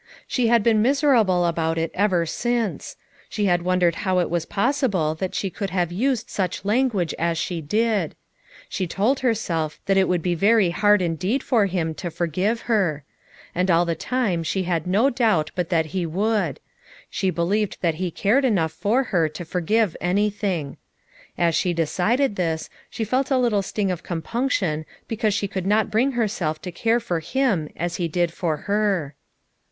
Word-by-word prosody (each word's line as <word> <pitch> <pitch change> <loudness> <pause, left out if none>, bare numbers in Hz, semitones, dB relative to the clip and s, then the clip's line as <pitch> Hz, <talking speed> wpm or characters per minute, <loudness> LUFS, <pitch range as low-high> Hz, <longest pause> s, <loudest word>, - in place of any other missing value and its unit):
She 250 -3 0
had 230 -2 +4
been 220 -2 +3
miser 280 +4 +3
able 185 -7 +3
about 165 -1 0
it 165 0 -1
ever 185 -4 +2
since; 235 +4 -2 0.3
she 210 - -1
had 175 -2 +2
wondered 180 -1 +1
how 185 -2 +1
it 175 - +1
was 170 -2 -1
possible 200 - +1
that 185 +3 -4
she 195 - -2
could 200 +1 -4
have 175 -2 -1
used 235 +4 0
such 185 -1 -3
language 210 -6 +1
as 170 0 0
she 170 0 -2
did; 210 +1 0 0.5
she 185 -2 -3
told 215 +10 +1
herself 175 - -1
that 195 0 +2
it 190 - +4
would 175 -3 0
be 180 - +1
very 200 +1 +3
hard 205 +2 +3
indeed 185 - -1
for 220 -5 +2
him 170 -4 -1
to 175 +2 -5
forgive 180 +8 -1
her; 185 -11 0 0.5
and 180 +2 0
all 175 0 +4
the 170 - 0
time 205 -1 -1
she 185 +4 -1
had 170 -2 -1
no 215 +10 +3
doubt 215 -11 +1
but 180 -3 -2
that 160 -3 0
he 185 -2 0
would; 195 - 0 0.5
she 190 - -1
believed 185 +5 0
that 170 -3 +2
he 185 - 0
cared 210 - +2
enough 190 -11 +2
for 220 +10 +1
her 170 -10 +1
to 155 +3 -8
forgive 185 +3 0
anything. 195 -5 -1 0.6
As 170 -1 +2
she 175 +2 +1
decided 200 - +1
this, 165 -3 -2 0.2
she 225 - -4
felt 255 +5 0
a 270 - +3
little 235 -5 +2
sting 195 0 -2
of 175 - -4
compunction 180 - -1 0.2
be 225 - -3
cause 215 -2 +1
she 200 - -1
could 190 -1 -4
not 210 +1 +2
bring 255 +6 +2
herself 200 -10 -1
to 180 - -5
care 230 +7 +1
for 180 -8 -2
him 195 - 0
as 175 +1 -3
he 175 - -1
did 170 +1 0
for 165 -5 -1
her. 200 -8 0
190 Hz, 185 wpm, -23 LUFS, 170-220 Hz, 0.6 s, had